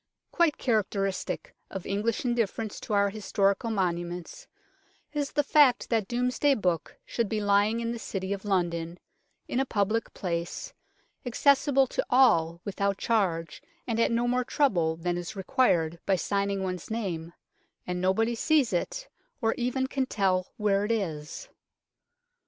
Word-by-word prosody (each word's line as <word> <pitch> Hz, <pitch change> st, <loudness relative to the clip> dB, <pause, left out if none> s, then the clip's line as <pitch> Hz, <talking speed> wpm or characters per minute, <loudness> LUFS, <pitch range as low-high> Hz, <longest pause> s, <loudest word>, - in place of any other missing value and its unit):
Quite 335 Hz, -4 st, +2 dB
characteristic 210 Hz, -, -1 dB, 0.2 s
of 190 Hz, -, -6 dB
English 210 Hz, +5 st, -1 dB
indifference 225 Hz, -3 st, -1 dB
to -, -, -5 dB
our 200 Hz, -1 st, +3 dB
historical 200 Hz, +1 st, 0 dB
monuments 180 Hz, -, -3 dB, 0.7 s
is 290 Hz, -1 st, -2 dB
the 290 Hz, -, +2 dB
fact 280 Hz, -5 st, +4 dB
that 220 Hz, -4 st, +1 dB
Domesday 250 Hz, +4 st, +2 dB
Book 180 Hz, -7 st, -1 dB
should 230 Hz, -4 st, -1 dB
be 220 Hz, -, -1 dB
lying 205 Hz, +2 st, +2 dB
in 230 Hz, 0 st, -2 dB
the 235 Hz, -, -4 dB
City 195 Hz, -2 st, -3 dB
of 200 Hz, -, -6 dB
London, 175 Hz, -4 st, -1 dB, 0.5 s
in 250 Hz, -, -1 dB
a -, -, +3 dB
public 215 Hz, -2 st, 0 dB
place, 175 Hz, -, -4 dB, 0.5 s
accessible 275 Hz, +2 st, +3 dB
to -, -, -2 dB
all 170 Hz, -10 st, +4 dB
without 200 Hz, 0 st, -1 dB
charge, 175 Hz, -9 st, 0 dB, 0.2 s
and 230 Hz, -2 st, -1 dB
at 230 Hz, -, +3 dB
no 235 Hz, +1 st, +1 dB
more 250 Hz, +1 st, +1 dB
trouble 180 Hz, -, +1 dB
than 175 Hz, +1 st, -2 dB
is 175 Hz, +4 st, -6 dB
required 180 Hz, -, +1 dB
by 195 Hz, -, +4 dB
signing 200 Hz, +1 st, -1 dB
one's 185 Hz, -2 st, -4 dB
name 175 Hz, -7 st, -3 dB, 0.5 s
and 180 Hz, 0 st, -3 dB
nobody 220 Hz, +6 st, +2 dB
sees 270 Hz, -1 st, +2 dB
it, -, -, -2 dB, 0.3 s
or 225 Hz, -4 st, +1 dB
even 250 Hz, +2 st, -1 dB
can 265 Hz, 0 st, -1 dB
tell 185 Hz, -4 st, 0 dB
where 205 Hz, -2 st, +2 dB
it 210 Hz, -, -1 dB
is. 170 Hz, -, -3 dB
205 Hz, 145 wpm, -28 LUFS, 185-245 Hz, 0.7 s, fact